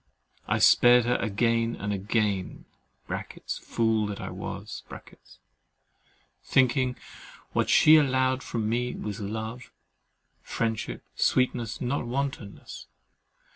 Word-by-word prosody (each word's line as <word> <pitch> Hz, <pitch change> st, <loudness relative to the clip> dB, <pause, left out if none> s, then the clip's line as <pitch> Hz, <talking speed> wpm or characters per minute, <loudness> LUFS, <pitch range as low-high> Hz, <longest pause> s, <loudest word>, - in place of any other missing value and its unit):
I -, -, +1 dB
spared 120 Hz, -1 st, +6 dB
her 120 Hz, -, +2 dB
again 115 Hz, +2 st, 0 dB
and 100 Hz, +1 st, -3 dB
again 100 Hz, -1 st, -1 dB, 1.0 s
(fool 110 Hz, -2 st, 0 dB
that 100 Hz, -1 st, -5 dB
I -, -, -6 dB
was) -, -, -7 dB, 1.6 s
thinking 130 Hz, 0 st, +2 dB, 0.6 s
what -, -, 0 dB
she 155 Hz, +1 st, +7 dB
allowed 130 Hz, -2 st, +2 dB
from 110 Hz, -4 st, -3 dB
me 120 Hz, +2 st, -1 dB
was 105 Hz, 0 st, -5 dB
love, 110 Hz, +4 st, -6 dB, 0.7 s
friendship, 115 Hz, -2 st, -3 dB
sweetness, 125 Hz, -3 st, 0 dB
not 125 Hz, 0 st, -2 dB
wantonness. 130 Hz, -5 st, -5 dB
115 Hz, 95 wpm, -27 LUFS, 110-125 Hz, 1.6 s, she